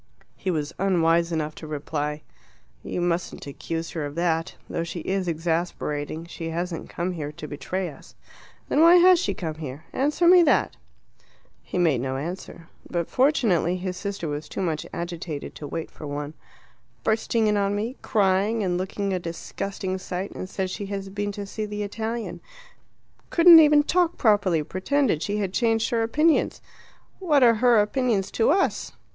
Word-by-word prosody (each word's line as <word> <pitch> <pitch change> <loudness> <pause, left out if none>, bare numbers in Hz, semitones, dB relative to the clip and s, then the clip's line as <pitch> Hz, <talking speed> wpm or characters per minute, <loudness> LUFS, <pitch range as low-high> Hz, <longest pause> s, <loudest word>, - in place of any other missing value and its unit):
He 190 - -4
was 155 -2 -2
unwise 170 -3 +2
enough 155 -2 -2
to 155 - -10
reply, 150 0 -3 0.6
"You 180 - -4
mustn't 175 0 -2
accuse 165 +3 -5
her 160 - -3
of 145 0 -5
that. 165 0 0
Though 165 - -2
she 170 0 -5
is 190 +2 -2
exasperating, 160 -2 -2
she 170 -1 -6
hasn't 170 0 -4
come 175 +2 -2
here 150 -4 -5
to 150 - -8
betray 180 +6 -3
us." 150 - -13 0.5
"Then 295 - +2
why 335 +2 +8
has 360 0 +7
she - - -1
come 160 -3 -4
here? 150 -1 -8
Answer 300 +6 +1
me 360 0 +8
that." 335 - +2 0.9
He - - -6
made 160 -9 +2
no 130 0 -2
answer. 170 +2 -7 0.2
But 170 -2 -2
fortunately 225 - +2
his 185 0 -4
sister 195 -2 -4
was 150 +1 -5
too - - -6
much 160 -4 -2
agitated 170 -3 -5
to 150 - -8
wait 165 +2 -5
for 150 - -9
one. 145 +1 -4 0.7
"Bursting 220 +1 +1
in 210 0 +2
on 200 0 +1
me 225 +5 -3
crying 205 0 +2
and 180 -2 0
looking 195 +1 -2
a 185 - 0
disgusting 185 +2 -4
sight 185 +1 -4
and 185 - -7
says 190 -1 -3
she 200 +1 -5
has 195 -1 -5
been 205 +1 -3
to 205 0 -5
see 215 +2 -4
the 210 0 -4
Italian. 225 +3 -4 0.9
Couldn't 335 -1 +9
even 300 -1 +6
talk 350 +2 +1
properly; 205 -8 +3
pretended 200 - 0
she 205 +3 -1
had 195 -3 -2
changed 225 -1 +1
her 230 -1 +1
opinions. 300 +8 +2 0.6
What 300 -8 +3
are 235 -1 +7
her 245 -3 +6
opinions 210 -2 +1
to 225 - +2
us? 380 +6 +1
185 Hz, 170 wpm, -25 LUFS, 165-220 Hz, 0.9 s, Couldn't